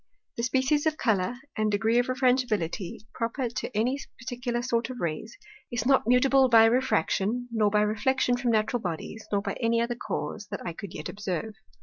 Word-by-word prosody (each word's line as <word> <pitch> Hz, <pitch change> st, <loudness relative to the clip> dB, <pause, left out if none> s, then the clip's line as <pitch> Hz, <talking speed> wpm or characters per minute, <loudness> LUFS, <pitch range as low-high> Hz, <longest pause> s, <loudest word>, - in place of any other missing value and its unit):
The -, -, -3 dB
Species 265 Hz, +5 st, +1 dB
of 310 Hz, 0 st, 0 dB
Colour, 210 Hz, -1 st, +1 dB, 0.2 s
and 215 Hz, 0 st, +1 dB
Degree 220 Hz, +3 st, +2 dB
of 245 Hz, -, +1 dB
Refrangibility 245 Hz, -9 st, 0 dB
proper 235 Hz, +2 st, -2 dB
to 215 Hz, -2 st, -5 dB
any 250 Hz, +6 st, +1 dB, 0.2 s
particular 245 Hz, 0 st, -3 dB
sort 235 Hz, 0 st, 0 dB
of 255 Hz, -1 st, -6 dB
Rays, 170 Hz, +7 st, -4 dB, 0.3 s
is 240 Hz, -1 st, -2 dB
not 265 Hz, -4 st, +3 dB
mutable 260 Hz, +2 st, +5 dB
by 225 Hz, -2 st, +7 dB
Refraction, 245 Hz, -1 st, +1 dB
nor 215 Hz, -2 st, +2 dB
by 210 Hz, 0 st, +2 dB
Reflection 245 Hz, +4 st, +1 dB
from 245 Hz, 0 st, -1 dB
Natural 220 Hz, +1 st, +1 dB
Bodies, 185 Hz, +4 st, -5 dB
nor 200 Hz, -1 st, +1 dB
by 200 Hz, -2 st, -3 dB
any 230 Hz, -1 st, +2 dB
other 235 Hz, +1 st, 0 dB
Cause, 215 Hz, -3 st, -5 dB
that 205 Hz, -, -6 dB
I 175 Hz, -, -3 dB
could 200 Hz, +1 st, -9 dB
yet -, -, -5 dB
observe. 200 Hz, 0 st, -4 dB
230 Hz, 185 wpm, -27 LUFS, 210-250 Hz, 0.3 s, by